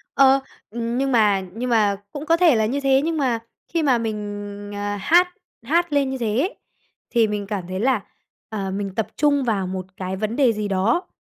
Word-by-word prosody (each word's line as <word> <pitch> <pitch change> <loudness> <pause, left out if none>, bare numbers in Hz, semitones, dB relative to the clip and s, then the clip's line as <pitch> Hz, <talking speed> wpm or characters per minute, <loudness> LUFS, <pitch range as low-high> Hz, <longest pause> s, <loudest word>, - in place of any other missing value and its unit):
Ờ, 270 0 +6 0.3
ừm, 235 +2 -3
nhưng 270 +1 0
mà 210 -5 +4
nhưng 245 +3 -3
mà 210 -4 +3
cũng 290 +1 -6
có 330 +1 +3
thể 335 -7 +5
là 220 -1 +2
như 270 +6 -1
thế 270 0 +3
nhưng 325 0 -1
mà 250 -5 +1 0.3
khi 330 -2 +1
mà 260 -4 +4
mình, 205 -2 -5
à, 205 0 -2
hát 350 - +5 0.4
hát 340 -2 +1
lên 280 -2 +2
như 265 - -3
thế 225 -2 -1
ấy, 360 +9 0 0.5
thì 230 -3 +3
mình 205 -1 -3
cảm 195 -4 -4
thấy 185 +1 -4
là, 245 -2 +2 0.5
à, 200 -3 -3
mình 195 0 -4
tập 220 - -1
trung 285 -2 +2
vào 200 -6 0
một 185 -1 -4
cái 185 0 -3
vấn 215 +3 -2
đề 255 -5 +4
gì 210 -1 -3
đó, 205 - +1
225 Hz, 215 wpm, -22 LUFS, 205-275 Hz, 0.5 s, Ờ